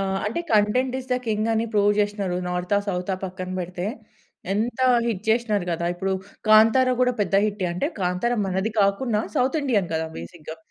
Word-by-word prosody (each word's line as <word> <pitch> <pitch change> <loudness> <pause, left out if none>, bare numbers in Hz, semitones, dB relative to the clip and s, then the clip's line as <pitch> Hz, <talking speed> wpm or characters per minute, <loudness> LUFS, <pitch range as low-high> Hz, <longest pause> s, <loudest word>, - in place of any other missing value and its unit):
ఆహ్, 195 0 -1
అంటే 225 +11 -2
content 235 +5 +2
is 260 0 -9
the - - +3
king 215 0 0
అని 225 0 +1
ప్రూవ్ 205 0 +4
చేసినారు. 205 -3 0
నార్తా? 180 +3 0
సౌతా? 180 0 -1
పక్కన 185 0 -6
పెడితే. 180 +1 -4 0.7
ఎంత 230 +5 -1 0.3
హిట్ 210 -4 -2
చేసినారు 220 -4 +1
కదా! 170 +1 -2
ఇప్పుడు 190 +2 -2 0.4
'కాంతార' 225 +4 +6
కూడా 250 0 +3
పెద్ద 200 - 0
హిట్టే 205 -3 -2
అంటే, 180 +12 -1
'కాంతారా' 185 +7 0
మనది 190 +4 -1
కాకుండా 210 +2 +1
సౌత్ 265 +5 +2
ఇండియన్ 210 -10 +1
కదా! 160 0 -1
బేసిక్‌గా. 155 - -9
205 Hz, 170 wpm, -24 LUFS, 185-230 Hz, 0.7 s, కాంతార